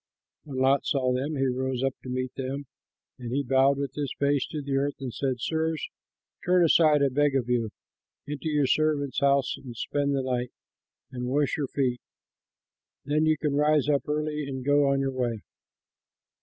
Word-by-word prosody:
When 140 -3 -7
Lot 135 +1 +3
saw 130 -2 +1
them, 140 +5 -2
he 135 -1 +1
rose 130 0 -1
up 135 0 +1
to 130 - -8
meet 130 0 -3
them, 135 +2 -4 0.5
and 120 -2 -6
he 140 +2 0
bowed 135 +1 +3
with 140 -1 -3
his 145 -2 -3
face 140 -1 +1
to 155 - -5
the 140 -1 -2
earth 140 +1 0
and 130 -4 -5
said, 135 -2 -1
"Sirs, 160 +3 -1 0.5
turn 180 0 +4
aside, 155 -3 +5
I 140 - +3
beg 145 +1 +2
of 125 -3 0
you, 120 -3 0 0.6
into 150 +2 -4
your 150 -2 +2
servant's 145 -2 +1
house 140 -1 +2
and 120 -4 -10
spend 140 +3 -1
the 135 - 0
night 125 -1 -2 0.6
and 125 -1 -4
wash 140 +1 +1
your 145 -3 -2
feet; 125 -3 -1 1.0
then 150 +2 +2
you 155 0 +3
can 150 -1 -1
rise 150 -1 +3
up 145 0 +1
early 150 -1 -2
and 130 -2 -5
go 145 0 +4
on 135 0 +2
your 135 0 0
way." 120 -4 -2
140 Hz, 185 wpm, -27 LUFS, 130-145 Hz, 1.0 s, aside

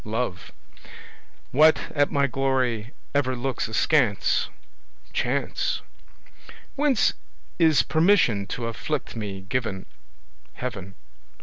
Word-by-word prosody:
Love. 110 -5 -3 1.0
What 155 +1 +4
at 145 -1 +2
my 140 -1 +2
glory 130 -4 0 0.2
ever 130 -3 +1
looks 125 0 -2
askance? 115 -1 +2 0.6
Chance. - - -1 0.9
Whence 280 -5 +3 0.5
is 160 -3 +5
permission 160 - +3
to 120 - -4
afflict 125 +5 -3
me 100 -4 -5
given? 100 -2 -3 0.7
Heaven. 95 -7 -6
125 Hz, 90 wpm, -25 LUFS, 110-145 Hz, 1.0 s, is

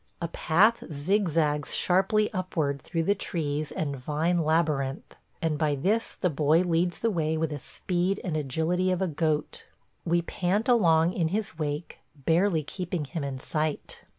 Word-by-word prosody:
A 170 - -2
path 200 +9 +3
zigzags 155 -2 +1
sharply 195 +4 +2
upward 160 -7 -1
through 165 +4 -2
the 200 - +3
trees 155 -6 -3
and 145 -3 -2
vine 155 +6 0
labyrinth, 155 -4 0 0.3
and 155 -2 0
by 150 -2 +2
this 205 +11 0
the 180 - 0
boy 155 +3 +3
leads 175 0 +1
the 230 - 0
way 160 -3 0
with 160 0 -1
the 145 - -4
speed 180 +6 -2
and 170 -4 -2
agility 160 +6 0
of 185 +1 0
a - - +1
goat. 155 -1 -2 0.4
We 170 0 +1
pant 190 +6 -1
along 170 -8 +4
in 165 -3 +1
his 195 -2 -3
wake, 150 +1 -3 0.2
barely 165 +4 +2
keeping 175 0 -4
him 145 +3 -5
in 135 -2 -4
sight. 155 +2 -3
165 Hz, 160 wpm, -27 LUFS, 150-180 Hz, 0.4 s, along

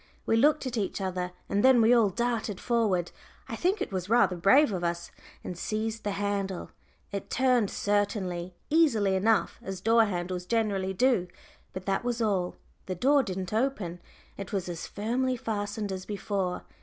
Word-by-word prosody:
We - - +2
looked 295 +5 +3
at 250 -2 -3
each 200 - -2
other, 185 -2 -2 0.2
and 200 +1 0
then 260 -1 +7
we 225 +2 +5
all 230 -4 +5
darted 230 -1 -2
forward 210 -8 +1 0.4
I - - -4
think 380 +4 +1
it - - -8
was 185 0 -3
rather 220 -6 +4
brave 230 - +5
of 180 -3 -3
us 170 0 -2 0.3
and 180 - -5
seized 215 +4 -3
the 205 - -1
handle. 200 -2 -2 0.4
It 200 -1 -5
turned 250 -5 +2
certainly, 190 -4 -1 0.2
easily 230 -12 +4
enough, 215 +3 +1
as 195 -1 -6
door 225 +3 +4
handles 180 -2 -3
generally 200 -4 0
do, 235 -4 +2 0.4
but 185 0 -7
that 195 +2 0
was 240 -1 -1
all. 195 -6 0 0.3
The 185 - -2
door 280 +9 +4
didn't 190 -5 -4
open; 215 -8 -1 0.4
it 195 -2 -7
was 195 -3 -2
as 170 -2 -5
firmly 250 +5 -1
fastened 205 -2 -3
as 185 -1 -5
before. 195 -3 -2
205 Hz, 170 wpm, -28 LUFS, 185-230 Hz, 0.4 s, then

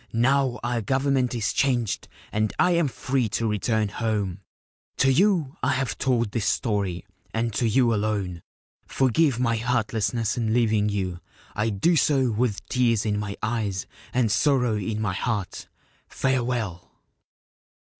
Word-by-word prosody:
Now 130 +2 +2
our 120 -1 -1
Government 130 +1 +1
is 115 -1 -1
changed 120 -6 0 0.2
and 110 0 0
I 180 - +4
am 170 -3 +2
free 130 -2 -1
to 115 - -1
return 110 0 0
home. 105 -5 -2 0.6
To 135 0 +4
you 170 -3 +2
I 135 +2 +2
have 130 -4 -2
told 120 -5 +1
this 110 -2 -1
story, 100 -5 -1 0.3
and 115 0 0
to 115 +3 +1
you 120 0 +3
alone. 100 -5 -1 0.5
Forgive 135 0 +2
my 115 -2 +1
heartlessness 115 -1 0
in 110 -1 0
leaving 110 -3 +2
you. 95 -4 -2 0.3
I 110 +2 0
do 110 - +2
so 135 -5 +3
with 110 -2 -1
tears 115 -4 +1
in 105 -1 0
my 100 -1 -4
eyes 105 -5 -1 0.3
and 120 -4 +1
sorrow 125 -1 +2
in 105 +1 -2
my 105 -3 -1
heart. 100 -1 -3 0.4
Farewell 120 -9 -2
115 Hz, 145 wpm, -25 LUFS, 105-130 Hz, 0.6 s, I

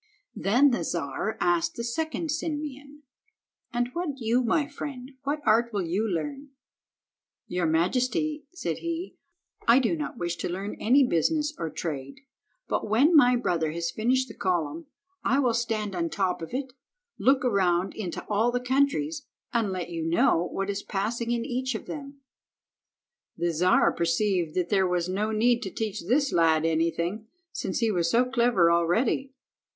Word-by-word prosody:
Then 250 +8 +4
the 210 -8 0
Czar 170 +6 -3
asked 170 -1 +1
the 235 - -4
second 315 +6 -2
Simeon— 295 -2 -5 0.7
"And 240 0 0 0.3
you, 240 +1 +1
my 280 +5 +1
friend, 275 -3 -7
what 295 +2 -1
art 235 +2 +3
will 200 -3 -1
you 200 +7 0
learn?" 275 - -4 1.0
"Your 180 -1 -1
majesty," 255 - 0
said 360 - -4
he, 335 +2 -4 0.5
"I 235 +2 +7
do 265 +4 +2
not 300 -5 -5
wish 175 -3 -2
to 170 - -3
learn 195 +4 -4
any 265 +4 +5
business 300 - +1
or 165 - -2
trade, 145 - -5 0.5
but - - -2
when 275 +10 +4
my 250 -4 +7
brother 165 -10 0
has 170 0 -2
finished 255 +4 +1
the 225 - -10
column, 185 - -2 0.4
I 265 - +2
will 255 -4 +2
stand 225 -3 -1
on 170 -1 0
the - - -2
top 185 +2 -1
of 165 - -6
it, 260 0 -4 0.5
look 270 0 +3
around 190 -5 +2
into 185 -6 -5
all 220 +3 +2
the 245 - 0
countries, 280 +4 0 0.3
and 225 -4 +1
let 180 -2 -4
you 165 -1 -3
know 165 +1 +2
what 195 +1 -2
is 200 0 -4
passing 225 +4 -2
in 235 -1 0
each 255 0 -2
of - - -5
them." 280 -1 -8 1.2
The 170 0 0
Czar 180 +4 +4
perceived 170 -1 0
that 180 -2 0
there 190 -2 +3
was 180 -1 0
no 200 +4 -1
need 235 +3 +2
to 200 - -4
teach 215 +1 -3
this 275 +4 +2
lad 160 -2 +3
anything, 170 +6 0 0.2
since 185 - -3
he 225 -1 +2
was 170 -4 +1
so 240 +7 +3
clever 235 -9 +3
already. 220 +11 +1
225 Hz, 165 wpm, -27 LUFS, 175-265 Hz, 1.2 s, I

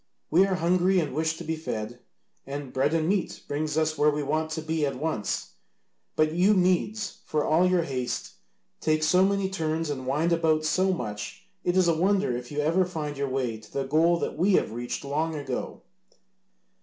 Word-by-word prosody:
We 185 +5 +5
are 190 - 0
hungry 180 +2 +3
and 150 -6 -2
wish 160 +2 0
to - - -7
be 160 0 -2
fed, 120 -6 -5 0.5
and 140 -1 -6
bread 145 +4 +1
and 160 -1 +1
meat 195 0 -1
brings 150 +1 -2
us 155 0 +1
where 150 - +5
we 150 0 -1
want 155 +3 -1
to 160 0 -3
be 160 -1 -1
at 140 -2 0
once, 150 -8 -2 0.6
but 155 0 +3
you 185 +6 +4
Medes, 185 +3 +1
for 150 -1 0
all 170 +4 +4
your 180 -2 +3
haste, 130 -5 -3 0.5
take 155 0 +1
so 180 +4 +4
many 200 0 +1
turns 160 -4 -2
and 130 -2 -5
wind 155 +6 +1
about 160 -2 +2
so 185 +4 +2
much 105 - -5 0.2
it 175 +1 +1
is 185 -2 +4
a 170 - +4
wonder 190 -3 +2
if 120 +1 -6
you 150 0 -1
ever 165 +5 +3
find 155 -5 -4
your 140 0 -2
way 125 -4 -2
to 110 - -17
the 140 - -1
goal 160 +5 +3
that - - -3
we 185 +5 +2
have 110 - +2
reached 120 +4 -4
long 155 +3 -1
ago." 135 -4 -5
155 Hz, 200 wpm, -27 LUFS, 140-175 Hz, 0.6 s, We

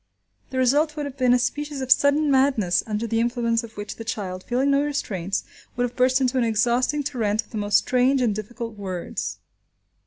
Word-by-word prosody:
The 260 - -5
result 295 +5 +2
would 295 - -2
have 280 -2 -7
been 255 -3 +2
a 250 - +6
species 290 +3 -2
of 260 -1 -4
sudden 285 +2 +4
madness, 260 -10 +3
under 215 +1 -2
the 225 0 0
influence 235 0 0
of 225 -2 -11
which 205 0 -6
the 225 - -6
child, 190 -5 -4
feeling 260 +3 +1
no 280 0 +3
restraints, 200 -10 -2 0.3
would 245 - 0
have 245 0 -3
burst 255 +1 +3
into 260 0 +1
an - - +2
exhausting 240 +6 +1
torrent 225 -6 -1
of - - -26
the 220 - -5
most 205 0 +3
strange 255 +2 +2
and 240 -4 +2
difficult 225 +2 -6
words. 185 -3 -4
245 Hz, 205 wpm, -24 LUFS, 215-270 Hz, 0.3 s, a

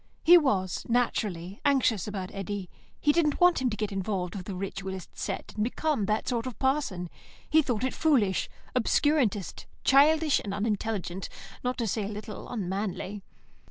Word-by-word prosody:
He 345 +2 +9
was, 200 - +2
naturally, 205 -6 -1
anxious 255 -9 +2
about 195 -3 -5
Eddy. 195 -1 -5 0.3
He 295 - +4
didn't 300 -2 +2
want 355 -5 +5
him 255 - +2
to 215 - -4
get 210 -1 -2
involved 190 -2 -2
with 185 -2 -6
the 195 - -4
ritualist 190 0 -5
set - - -4
and 210 - 0
become 250 -2 0
that 215 +1 0
sort 240 0 -1
of 250 - -6
parson; 265 -10 0 0.4
he 315 +1 +5
thought 245 -5 -2
it 260 - 0
foolish, 245 -12 +2 0.3
obscurantist, 250 - +1 0.2
childish, 300 +2 +5
and 200 -1 -3
unintelligent, 205 -3 -2 0.3
not 250 0 -1
to 235 - -1
say 215 0 -1
a - - -3
little 210 0 -7
unmanly. 200 -1 -3
215 Hz, 160 wpm, -28 LUFS, 195-265 Hz, 0.4 s, He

